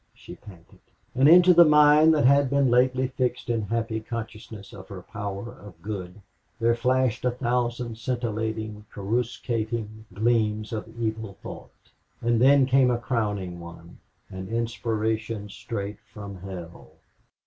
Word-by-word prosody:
she - - -12
panted. 90 -5 -16 0.3
And 135 +3 +5
into 180 +2 +8
the 170 0 +8
mind 150 0 +6
that 145 - +2
had 140 0 +5
been 140 -2 +2
lately 130 +1 +2
fixed 125 -2 -2
in 115 -1 0
happy 110 +1 -2
consciousness 110 -2 -8
of 95 -1 -11
her 95 -3 -9
power 100 +1 -6
of 100 -5 -14
good 100 -2 -6 0.4
there 115 +1 +3
flashed 125 0 0
a 125 - +2
thousand 120 -1 -2
scintillating, 110 -3 -3
corruscating 110 0 -3
gleams 110 +1 0
of 110 0 -4
evil 110 -3 -3
thought. - - -9 0.5
And 120 -1 +1
then 135 +1 +6
came 130 0 +4
a 120 - +1
crowning 105 -7 -2
one, 85 0 -12 0.3
an 95 0 -7
inspiration 110 -1 -2
straight 100 0 -6
from 100 -3 -9
hell. 90 -3 -10
115 Hz, 135 wpm, -25 LUFS, 105-125 Hz, 0.5 s, into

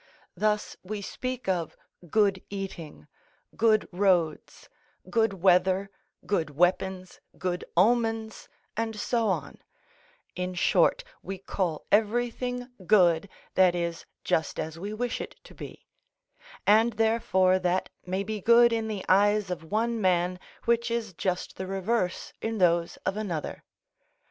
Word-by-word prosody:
Thus 210 0 0
we 205 +2 -5
speak 255 +4 -5
of 175 -4 -1 0.3
good 200 -2 +2
eating, 195 -7 -7 0.5
good 220 -1 +3
roads, 175 -4 0 0.4
good 225 -3 +2
weather, 190 +1 +3 0.3
good 170 -6 0
weapons, 180 +4 0 0.2
good 180 -1 -2
omens, 225 +2 +1 0.3
and 225 -1 -2
so 230 0 0
on; 175 -8 -2 0.8
in 180 0 -3
short, - - +3 0.2
we 195 - -6
call 180 -4 -3
everything 240 +3 +1 0.2
good 180 -3 +4 0.2
that 185 -2 +4
is 170 -1 -3 0.2
just 160 - 0
as 160 +1 -4
we 200 +4 -5
wish 240 +3 -2
it - - -7
to - - -14
be; - - -10 0.8
and 225 +3 +5
therefore 205 -4 +2
that 180 0 0
may 185 +2 -2
be 215 0 -4
good 235 +2 +6
in 225 -1 -1
the 210 -3 -4
eyes 205 0 +3
of 165 -2 -6
one 230 +1 0
man 180 -1 +1 0.3
which 235 0 +2
is 230 -4 -2
just 180 +1 -3
the 190 - -4
reverse 195 0 -1
in 225 0 -2
those 170 -3 +2
of 195 - -1
another. 180 -8 -4
195 Hz, 130 wpm, -27 LUFS, 180-225 Hz, 0.8 s, good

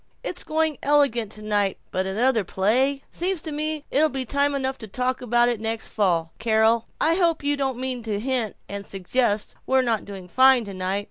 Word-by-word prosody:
It's - - -3
going 315 -1 0
elegant 275 -7 +2
tonight, 210 -2 0
but 190 +1 -1
another 225 +3 +2
play 255 +10 +1
Seems 365 +1 -1
to 315 - -5
me 305 0 -2
it'll 310 +3 +3
be 270 -2 -3
time 280 +3 +1
enough 265 -1 -2
to 220 - -8
talk 255 +5 -2
about 240 0 +3
that 240 -3 0
next 225 0 -2
fall. 170 -6 0
Carol! 225 +1 +2
I 325 - +3
hope 335 -3 +1
you 290 0 +1
don't 270 -3 -2
mean 255 -1 -3
to 215 -3 -3
hint 245 -2 -1
and 200 0 -5
suggest 205 +3 -1
we're 265 0 +3
not 230 -4 0
doing 195 -3 -9
fine 260 +4 +5
tonight? 190 0 -2
240 Hz, 190 wpm, -24 LUFS, 210-275 Hz, -, fine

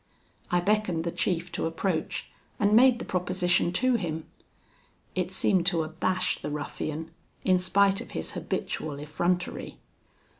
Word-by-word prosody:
I 175 0 +2
beckoned 190 -4 +1
the 170 - -2
chief 175 0 -1
to - - -1
approach, 165 0 -2 0.3
and 205 0 +3
made 250 +1 +7
the - - -6
proposition 180 -1 +1
to 255 +5 +3
him. 160 -5 -3 0.9
It 185 0 -1
seemed 190 -1 +2
to 170 -3 +3
abash 180 +3 0
the - - -3
ruffian, 150 +2 -4 0.3
in 185 -1 +4
spite 195 +1 +3
of - - -9
his 80 - -4
habitual 150 -2 -3
effrontery. 175 +4 -2
180 Hz, 140 wpm, -28 LUFS, 165-190 Hz, 0.9 s, made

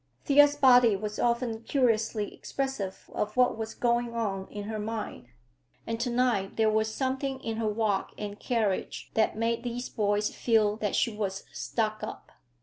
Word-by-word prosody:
Thea's 290 0 +6
body 250 -6 +6
was 210 +1 -4
often 235 -1 0
curiously 225 -4 +1
expressive 265 -9 -4
of 210 +3 -2
what 250 -2 +4
was 220 0 -5
going 240 -1 0
on 195 -4 -2
in 205 -1 -6
her 215 +1 -4
mind, 215 - -5 0.6
and 230 0 -3
to 245 +1 0
night 235 -5 +1
there 220 -1 +4
was 220 0 +1
something 265 +2 -2
in 225 -1 -3
her 225 -1 0
walk 210 -2 0
and 205 -1 -6
carriage 220 -6 -1
that 220 -1 +2
made 230 +1 0
these 245 +1 -4
boys 205 0 0
feel 215 -3 +2
that 210 -2 -1
she 230 - +1
was 195 -2 -3
"stuck 215 -2 -2
up." - - -7
225 Hz, 165 wpm, -28 LUFS, 210-240 Hz, 0.6 s, Thea's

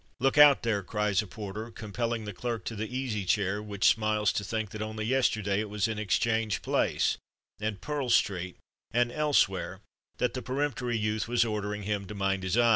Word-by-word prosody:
"Look 135 +1 +2
out, 145 -2 +8
there!" 110 -4 +1
cries 105 0 0
a 105 - -8
porter 105 +3 -6
compelling 115 +1 -3
clerk 115 0 -4
to 115 - -4
the 110 +1 -3
Easy 125 -5 -2
Chair, 100 +2 +1
which 105 -1 +1
smiles 110 -1 +3
to 100 - -1
think 110 0 -3
that 110 - -6
only 110 0 -3
yesterday 110 -5 +1
it 110 -1 -3
was 105 -1 0
in 110 -1 -3
Exchange 110 +2 +1
Place, - - +1 0.4
and 105 -2 -3
Pearl 145 -4 -2
Street, 90 -5 +1 0.3
and 120 +1 +1
elsewhere 150 +1 +1 0.4
that 125 -1 0
the 130 - -3
peremptory 125 -2 -1
youth 110 0 -1
was 120 0 +3
ordering 105 -1 -3
him 100 -1 -2
to 105 - -7
mind 95 -1 0
his 95 +4 -1
eye. 120 -1 +5
110 Hz, 190 wpm, -29 LUFS, 100-120 Hz, 0.4 s, out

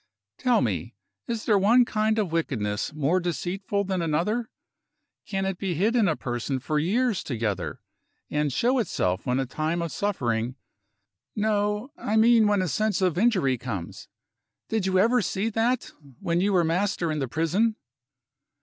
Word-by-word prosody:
Tell 250 -2 +3
me - - -2 0.3
is 230 -2 -3
there 210 -3 +4
one 235 +6 +5
kind 215 -1 0
of 205 -6 0
wickedness 115 -11 -1
more 155 +4 +1
deceitful 185 +4 -2
than 190 -2 -2
another? 180 +9 0 0.8
Can 195 -3 -2
it 190 -2 -3
be 190 -3 -2
hid 210 +9 +1
in 225 -4 +4
a 160 - +1
person 120 +1 -3
for 150 +4 -1
years 220 +6 +1
together, 105 - -3 0.4
and 150 -1 0
show 250 - +2
itself 95 - -1
when 125 +1 +1
a 135 - 0
time 155 +6 -2
of 170 -2 -3
suffering 125 - -1 0.8
no; 210 +3 0
I 215 - -1
mean 225 -1 +6
when 205 -2 +2
a - - -1
sense 215 +4 0
of 185 -4 +1
injury 180 - +2
comes? 100 -9 -6 0.6
Did 220 -4 0
you 190 0 +2
ever 235 +6 +4
see 200 +2 -1
that, 230 +3 0 0.3
when 175 -2 0
you 200 +2 +2
were 180 -2 +4
master 175 0 0
in 155 - -2
the 135 - -1
prison?" 170 - +1
185 Hz, 165 wpm, -26 LUFS, 150-215 Hz, 0.8 s, mean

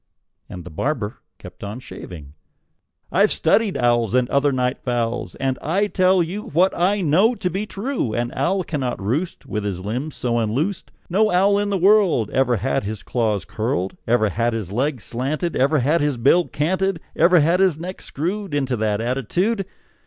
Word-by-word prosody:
And 90 -4 -8
the 90 - -10
barber 110 - -2 0.2
kept - - -12
on 105 +4 -5
shaving. 80 - -10 0.8
"I've - - +4
studied 220 -4 +2
owls, 120 -2 +2
And 125 -1 +3
other 140 +1 +3
night 125 0 -1
fowls, 120 -1 -2
And 135 -1 -2
I 190 +7 +1
tell 185 -2 +3
you 185 +6 -4
What 180 +5 +2
I 195 +4 +1
know 190 +9 +3
to 180 - -2
be 200 +4 -3
true: 215 - -2
An 120 +1 -1
owl 185 +8 0
cannot 135 -7 -3
roost 130 - -2
With 105 -1 -3
his 95 -2 -4
limbs 125 +9 -3
so 120 -1 0
unloosed; 135 - -1 0.2
No 210 +5 +2
owl 200 +2 +3
in 205 0 -1
this 195 -2 0
world 185 - +4
Ever 130 -2 +2
had 135 +5 -1
his 105 0 -5
claws 110 -5 -1
curled, 110 -4 -2
Ever 115 -2 +3
had 115 +4 0
his 105 -5 -4
legs 130 +1 -1
slanted, 145 +8 -2
Ever 140 +4 +3
had 145 +5 +2
his 145 -3 0
bill 140 +9 +3
canted, 185 +4 0 0.2
Ever 170 +2 +5
had 165 +4 +3
his 185 -5 +3
neck 180 +3 -7
screwed 185 +3 -3
Into 135 -3 0
that 105 -1 0
attitude. 175 - -1
140 Hz, 180 wpm, -21 LUFS, 115-185 Hz, 0.8 s, Ever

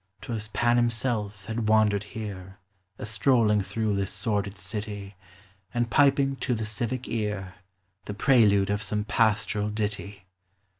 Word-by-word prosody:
'T 125 - -7
was 110 -1 -3
Pan 120 +2 +2
himself 115 -4 -1
had 110 -1 -2
wandered 110 -2 +4
here 100 -3 -7 0.4
A - - -6
strolling 110 -1 +3
through 110 +1 -1
this 100 0 -1
sordid 100 -1 -2
city, 100 +1 -5 0.6
And 120 -2 0
piping 135 +1 +4
to 125 -2 -1
the 110 -1 -3
civic 115 +4 -3
ear 105 -4 -3 0.5
The 105 - -5
prelude 105 -6 +4
of 105 +1 0
some 105 0 -1
pastoral 105 -1 +1
ditty 105 -2 -4
105 Hz, 140 wpm, -27 LUFS, 100-115 Hz, 0.6 s, wandered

